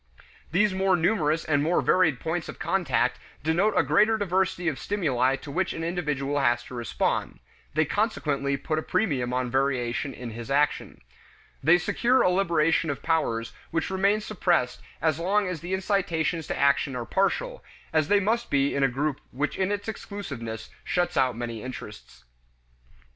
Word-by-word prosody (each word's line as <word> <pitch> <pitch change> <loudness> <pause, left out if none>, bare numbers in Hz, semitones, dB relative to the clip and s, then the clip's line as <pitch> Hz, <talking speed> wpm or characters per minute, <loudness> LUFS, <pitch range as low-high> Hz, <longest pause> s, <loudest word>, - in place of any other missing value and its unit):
These 195 +4 +3
more 190 0 +2
numerous 160 -3 +1
and 145 -2 +2
more 165 +4 +2
varied 160 -8 +3
points 160 +1 -3
of - - -7
contact - - 0 0.2
denote 175 +7 +2
a - - +5
greater 220 +1 +3
diversity 185 -3 0
of 145 -6 -1
stimuli 135 -10 +1
to 140 - -9
which 185 +5 0
an 165 - -5
individual 150 -5 -1
has 120 -3 +2
to 125 - -12
respond; 120 -1 -1 0.4
they 155 +1 +3
consequently 145 - 0
put 155 +3 -2
a - - -3
premium 140 - 0
on 125 -1 -1
variation 130 0 0
in 125 -2 -7
his 115 +1 -8
action. 145 +1 0 0.6
They 160 +5 +6
secure 240 +9 +2
a 180 - +4
liberation 165 -3 +2
of 140 -1 -4
powers 115 -9 0 0.2
which 165 +2 -2
remain 200 +3 +2
suppressed 175 -11 0 0.2
as 160 -1 +2
long 200 +3 +1
as 180 -4 -4
the 175 +2 -6
incitations 180 -4 -1
to - - -3
action 140 -1 +2
are 120 -1 -3
partial, - - 0 0.3
as 155 -2 +2
they 205 +3 +4
must 225 +4 0
be 140 0 +2
in 140 - 0
a - - +6
group 140 +3 -2
which 145 +4 -2
in 190 +1 0
its 205 +1 -3
exclusiveness 140 - -6
shuts 175 -1 0
out 130 -4 +2
many 115 -2 -4
interests. 105 - -9
160 Hz, 170 wpm, -26 LUFS, 135-190 Hz, 0.6 s, They